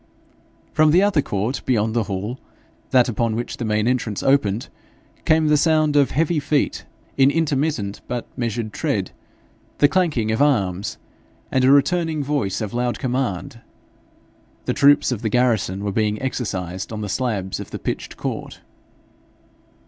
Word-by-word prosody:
From 155 0 +4
the 175 +5 +5
other 200 -7 +3
court 110 +3 -2
beyond 110 -3 +1
the 115 -2 0
hall, 105 +6 -4 0.5
that 125 -2 +4
upon 115 -1 -1
which 120 +1 -4
the 120 - -3
main 105 0 +1
entrance 120 -5 -1
opened, 120 -6 +2 0.6
came 155 0 +3
the 150 0 +4
sounds 155 -1 +2
of 140 -2 +4
heavy 160 +2 +1
feet 145 0 -1 0.3
in 135 0 +6
intermittent 145 -9 -1
but 120 -1 -3
measured 115 -2 -3
tread, - - -1 0.7
the 145 - +6
clanking 150 - +1
of 110 - 0
arms, 100 -10 +1 0.5
and 130 - +2
a 130 - +6
returning 155 +2 +2
voice 135 -10 -1
of 105 -2 -4
loud 120 0 -1
command: 120 -4 -3 1.0
the - - 0
troops 145 0 +4
of 115 -4 -2
the 110 - -1
garrison 110 -5 +1
were 100 - -1
being 105 0 0
exercised 95 -8 -4
on 110 -1 -5
the 105 - -3
slabs 100 -4 -2
of - - -7
the - - -5
pitched - - -5
court. - - -5
125 Hz, 155 wpm, -21 LUFS, 105-145 Hz, 1.0 s, in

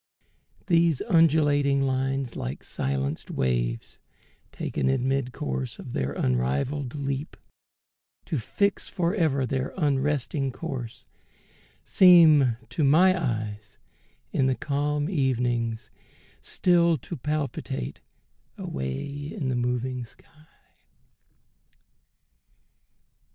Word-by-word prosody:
These 170 -5 +3
undulating 145 -7 +3
lines, 135 -1 -1
like 65 +4 -5
silenced 70 +2 -3
waves - - -2 0.5
Taken 65 -2 -2
in 120 - +1
mid 135 -1 0
course 65 - -4
of - - -9
their 65 +2 -1
unrivalled 70 - -1
leap, 140 +1 -4 0.9
To 155 - -2
fix 200 - -1
forever 170 -7 +1
their 130 0 -3
unresting 140 -2 0
course, 130 -8 -6 0.8
Seem 155 - +6
to 160 - -1
my 175 +7 +5
eyes, 110 - -4 0.5
in 135 - +2
the 130 - +1
calm 145 +1 -1
evenings, 120 - -1 0.5
still 170 -2 +2
To 125 - -7
palpitate 135 - -3 0.6
away 65 0 -4 0.3
into 135 - -3
the 130 - 0
moving 125 +1 -1
sky. 150 +6 -22
135 Hz, 95 wpm, -26 LUFS, 115-150 Hz, 0.9 s, Seem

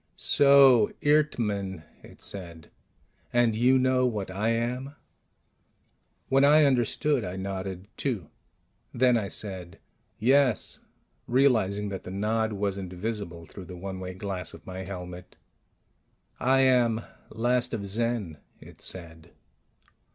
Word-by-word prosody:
"So. 135 -5 +6
Eert 150 +1 +3
mn," 100 -6 -3 0.2
it - - -15
said. 85 -5 -4 0.6
"And 120 -2 +3
you 125 +4 +4
know 130 0 +2
what 105 -6 -3
I 105 +4 -1
am?" 125 +4 -2 1.3
When 135 +1 +3
I 150 +2 +6
understood, 135 0 +1
I 90 -1 -5
nodded, 95 0 -5
too. 115 - -3 0.6
Then 125 0 +4
I 110 -4 0
said, 95 -4 -4 0.4
"Yes," 130 -1 +2 0.5
realizing 110 -6 +2
that 95 -2 -5
the - - -9
nod 110 +3 -1
wasn't 100 -2 -3
visible 90 -4 -5
through 95 +3 -11
the 90 0 -9
one 95 +1 -6
way 90 0 -6
glass 95 -3 -5
of - - -16
my 95 0 -7
helmet. 90 -1 -8 1.0
"I 135 +1 +3
am 120 -4 +3 0.3
last 120 +2 0
of 105 -4 -4
Zen," 105 -6 -2 0.2
it - - -15
said. 85 -2 -6
105 Hz, 125 wpm, -27 LUFS, 95-125 Hz, 1.3 s, So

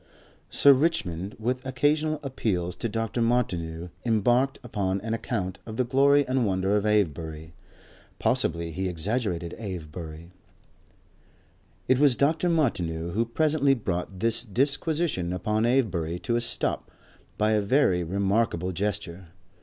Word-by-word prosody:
Sir 140 - +6
Richmond, 105 - -1
with 125 +3 -2
occasional 150 +4 +1
appeals 95 -10 -2
to 115 - -2
Dr. 115 +2 -2
Martineau, 90 -8 -1
embarked 120 +4 +2
upon 100 -5 -1
an 110 +2 -3
account 100 -5 -3
of 110 -1 -8
the 130 - +3
glory 140 +3 +4
and 130 0 +1
wonder 95 -1 +1
of 105 0 +1
Avebury. 80 -6 -1 0.6
Possibly 85 0 0
he 95 +3 -2
exaggerated 90 -1 -2
Avebury.... 85 -4 -7 1.6
It 130 0 +3
was 140 -4 +5
Dr. 160 +6 +2
Martineau 85 - 0
who 110 +6 0
presently 140 +2 +2
brought 95 -4 -4
this 115 +1 +2
disquisition 140 - 0
upon 105 +5 0
Avebury 95 -10 0
to 120 - 0
a 120 - +1
stop 115 - -1 0.5
by 105 +1 +2
a 105 -1 +3
very 100 -5 +2
remarkable 95 0 0
gesture. 95 -1 -3
105 Hz, 130 wpm, -26 LUFS, 90-130 Hz, 1.6 s, Sir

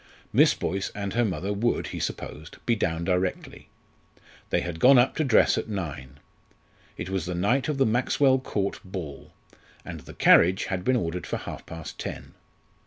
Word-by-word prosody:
Miss - - +5
Boyce 95 +1 -2
and 100 -2 -4
her 120 +2 +2
mother 100 -1 -2
would, 115 +4 0
he - - -5
supposed, 75 +1 -6
be 120 - +2
down 85 -5 -1
directly. 90 +1 -2 0.8
They - - +1
had 85 -2 -5
gone 130 +6 +7
up 125 +1 +4
to 160 - +2
dress 130 -6 +4
at - - -6
nine. 70 -9 -5 0.8
It 95 - -5
was 95 -3 -2
the 90 - -3
night 120 - +1
of 150 - -1
the 135 - +3
Maxwell 130 +3 +3
Court 100 -6 -2
ball, 90 -8 -7 0.5
and - - -7
the - - -13
carriage 90 +3 +5
had 95 -2 -3
been 130 +6 +2
ordered 90 -6 -2
for - - -2
half - - -8
past 80 -1 -8
ten. - - -6
95 Hz, 175 wpm, -26 LUFS, 85-120 Hz, 0.8 s, gone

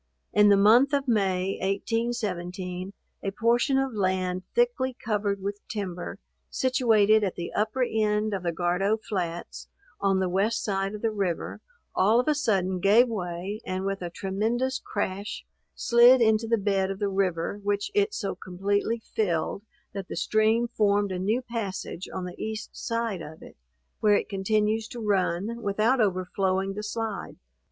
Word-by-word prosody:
In 210 0 +6
the 200 - +6
month 235 +8 +5
of 280 -1 +1
May, 195 -4 +1
1817, 190 -3 -2 0.3
a 195 - -2
portion 235 +6 +2
of 270 -2 0
land 185 -2 0
thickly 465 - +1
covered 205 -3 -1
with 200 +1 -3
timber, 185 -5 -5 0.3
situated 220 -5 +3
at 190 - -1
the 170 - -5
upper 220 +5 0
end 215 -2 0
of 195 - -2
the 170 -1 -1
Gardow 180 +5 +1
flats, 180 -6 -4 0.3
on 195 -1 +2
the 190 - +1
west 195 +5 0
side 195 0 -1
of 210 - -9
the 225 - +2
river, 195 -5 -2 0.3
all 215 +5 +4
of 250 - 0
a 305 - +4
sudden 190 -10 0
gave 210 +7 +5
way, 190 0 -4
and 185 +1 -3
with 195 -1 -2
a 175 - -3
tremendous 220 +9 -1
crash, 200 0 -3 0.3
slid 240 +2 +6
into 220 -1 +3
the 230 0 +2
bed 195 -2 +1
of 195 - -3
the 205 0 -1
river, 190 -1 -1
which 205 0 -1
it 410 +1 +2
so 195 -2 -2
completely 200 +5 -2
filled, 185 -2 0 0.3
that 195 -2 -5
the - - -6
stream 220 +2 +2
formed 205 -3 +1
a 185 - -3
new 215 +7 0
passage 200 -6 -5
on 185 - -4
the 180 0 -7
east 220 0 -5
side 230 -5 -2
of 155 +1 -10
it, - - -13 0.4
where 210 -1 +4
it - - 0
continues 215 +2 0
to 240 - -8
run, 205 +1 0
without 220 +5 +2
overflowing 190 0 0
the 210 - -5
slide. 215 -1 -4
205 Hz, 160 wpm, -27 LUFS, 190-225 Hz, 0.4 s, In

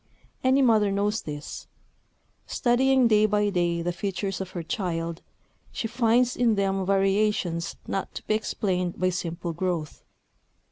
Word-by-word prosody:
Any 260 +1 +4
mother 215 -5 +4
knows 205 +2 0
this. 145 -1 -7 0.8
Studying 260 +1 +3
day 215 -1 +4
by 210 -1 +1
day 170 -2 0
the 175 +1 -1
features 195 0 -3
of 190 - -5
her 170 - -3
child, 170 -4 -3 0.5
she 225 - -3
finds 240 +1 +2
in 235 -3 +3
them 195 -1 0
variations 195 -3 +1
not 195 - -3
to - - -7
be - - +1
explained 185 -4 -1
by 185 +1 +2
simple 170 -1 -4
growth. 170 -3 -3
195 Hz, 140 wpm, -26 LUFS, 175-220 Hz, 0.8 s, Any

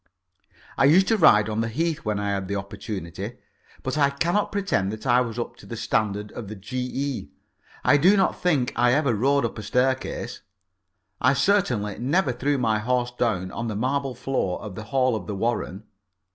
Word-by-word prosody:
I - - +6
used 180 +7 +6
to 225 - +4
ride 105 - +6
on 110 0 -1
the 115 - -1
Heath 160 +7 -1
when 105 -2 -1
I 100 0 -1
had 95 -1 -2
the 100 - -2
opportunity, 100 -3 -6 0.5
but 130 +3 -2
I 140 -1 +5
cannot 170 +8 0
pretend 185 - 0
that 110 0 -8
I 125 -1 +4
was 115 -2 -4
up 120 - -4
to - - -14
the 115 - -6
standard 105 -2 -1
of 115 - -7
the 110 - -7
G.E. 125 - -4 0.5
I 145 - +5
do 185 +8 +5
not 190 - +1
think 145 -9 +1
I 120 +1 +3
ever 140 -3 +2
rode 135 +4 +2
up 115 - -4
a - - -4
staircase. 130 +5 -1 0.8
I 130 +2 +4
certainly 125 - +1
never 140 +4 +1
threw 140 +4 0
my 110 -4 +1
horse 125 +2 0
down 110 -7 -1
on 120 - -4
the 110 - -3
marble 130 +3 -1
floor 125 -8 -2
of 105 - -7
the 110 +3 -7
hall 130 +1 +1
of 100 -5 -5
the 105 - -3
Warren. 105 -2 -2
120 Hz, 195 wpm, -25 LUFS, 105-140 Hz, 0.8 s, I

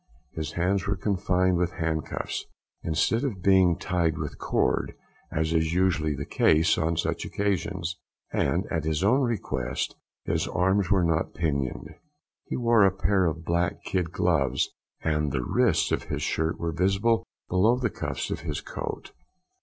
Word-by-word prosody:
His 80 -1 -5
hands 95 +3 0
were 100 - +1
confined 95 -2 +1
with 85 0 0
handcuffs, 80 -2 -3 0.3
instead 85 - +1
of 105 -10 -3
being 95 -3 +5
tied 85 -3 0
with - - -5
cord, - - 0 0.4
as 80 +1 0
is 80 0 +1
usually 80 -5 +2
the 70 +1 -5
case 80 +1 +3
on 80 +1 0
such - - -1
occasions, 95 -3 -2 0.3
and, - - +1
at 80 - 0
his 80 +1 0
own 125 +8 +4
request, 70 - -2 0.3
his - - 0
arms 95 +3 +1
were 95 -3 +3
not 80 -1 0
pinioned. 75 -1 -2 0.5
He - - -3
wore 115 -3 +4
a 95 - +5
pair 95 -1 +2
of 80 0 -3
black 85 +1 0
kid 90 -3 -1
gloves, 75 -8 +1 0.3
and 75 -2 +1
the 65 -2 -1
wrists - - +2
of - - 0
his - - -3
shirt 80 +1 -1
were 85 -1 -1
visible 95 +7 +2 0.2
below 105 +7 +3
the 120 -4 -1
cuffs 75 -3 -4
of - - -2
his - - -3
coat. - - -6
85 Hz, 160 wpm, -27 LUFS, 80-95 Hz, 0.5 s, being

